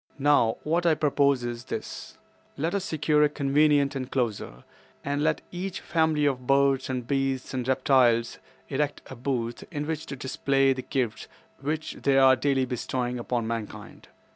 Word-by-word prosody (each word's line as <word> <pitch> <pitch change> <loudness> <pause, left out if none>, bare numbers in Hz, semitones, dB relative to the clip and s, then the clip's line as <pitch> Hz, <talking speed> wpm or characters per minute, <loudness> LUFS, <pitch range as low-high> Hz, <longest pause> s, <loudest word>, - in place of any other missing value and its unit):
"Now, 140 -5 +3
what 170 +3 +1
I 160 - +4
propose 140 -3 +2
is 120 +1 -5
this: - - -7 0.4
Let 160 +5 -1
us 200 -2 -1
secure 155 -3 +1
a 150 - +5
convenient 145 0 +2
enclosure, 120 - -3 0.4
and 145 +1 -1
let 155 0 +1
each 185 +1 -4
family 160 -3 +1
of 130 -3 -1
birds 135 -1 +3
and 125 -2 -3
beasts 135 -1 -1
and 125 -1 -3
reptiles 130 -3 +3 0.3
erect 145 +1 -2
a - - -6
booth 120 -2 -3
in 150 -4 -4
which 160 0 -4
to 140 - -5
display 135 +1 +1
the 130 - -5
gifts 125 -5 -3 0.3
which 155 +3 -3
they 140 -1 +3
are 130 -1 +7
daily 135 0 +1
bestowing 125 0 -3
upon 120 -1 -2
mankind. 115 -2 -6
135 Hz, 160 wpm, -26 LUFS, 125-150 Hz, 0.4 s, are